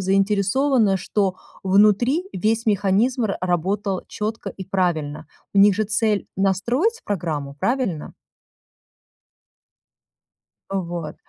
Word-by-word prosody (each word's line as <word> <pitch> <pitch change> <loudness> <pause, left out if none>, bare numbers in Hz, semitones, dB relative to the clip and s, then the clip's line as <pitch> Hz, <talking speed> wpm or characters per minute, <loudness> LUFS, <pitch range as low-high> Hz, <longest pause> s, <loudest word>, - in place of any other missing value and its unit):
заинтересована, 200 +4 +2
что 190 -1 -1 0.3
внутри 210 - +3
весь 220 +5 0
механизм 210 +4 +2
р-работал 190 +1 -1
четко 215 +2 -4
и 190 - -8
правильно. 170 -6 -1 0.3
У - - +3
них 200 0 +7
же 215 - +1
цель 215 0 0
настроить 240 - +1
программу, 155 -8 -3
правильно? 195 - -2 2.6
Э, 195 - 0
вот. 170 -4 -5
195 Hz, 95 wpm, -22 LUFS, 185-220 Hz, 2.6 s, них